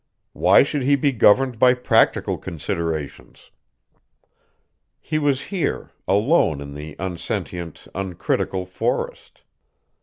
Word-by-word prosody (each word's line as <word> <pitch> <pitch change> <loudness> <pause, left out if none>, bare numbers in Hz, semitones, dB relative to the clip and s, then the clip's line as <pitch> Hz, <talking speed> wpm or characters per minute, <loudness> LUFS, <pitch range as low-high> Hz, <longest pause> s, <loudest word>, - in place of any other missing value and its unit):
Why - - +5
should 145 0 -2
he 140 +2 +3
be 140 +1 +1
governed 125 +1 +3
by 125 +1 +6
practical 125 - +2
considerations? 80 -2 -5 1.5
He 155 0 -2
was 140 -3 +1
here, 170 - -2 0.2
alone 100 - +2
in 70 0 -8
the 75 +1 -8
unsentient, 90 -2 -5
uncritical 95 0 -2
forest. 90 - -4
95 Hz, 100 wpm, -22 LUFS, 85-130 Hz, 1.5 s, by